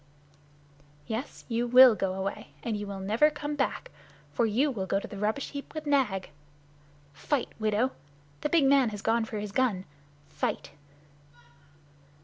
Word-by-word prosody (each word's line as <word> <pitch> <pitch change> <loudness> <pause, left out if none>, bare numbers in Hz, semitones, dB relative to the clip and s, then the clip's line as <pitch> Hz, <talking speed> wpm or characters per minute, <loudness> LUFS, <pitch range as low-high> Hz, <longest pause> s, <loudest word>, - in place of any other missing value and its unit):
"Yes, 230 +5 -5
you 235 0 -1
will 250 0 +9
go 195 -3 -2
away, 195 +3 -5
and 230 -2 -2
you 205 0 -4
will 200 -1 -6
never 220 +10 +3
come 295 0 -5
back. 280 - -2 0.4
For 235 - +2
you 260 +7 +2
will 195 -6 -4
go 195 - +1
to - - -8
the 210 - -9
rubbish 215 +6 -1
heap 280 +2 -8
with 310 -1 -5
Nag. 255 -10 +1 0.8
Fight, 270 - -1
widow! 220 +4 +1 0.5
The 300 - -1
big 320 -2 +4
man 270 -3 +5
has 210 -1 -7
gone 225 0 +2
for 220 - -6
his 210 -1 -4
gun! 200 -5 0 0.4
Fight!" - - -3
230 Hz, 155 wpm, -28 LUFS, 205-270 Hz, 0.8 s, will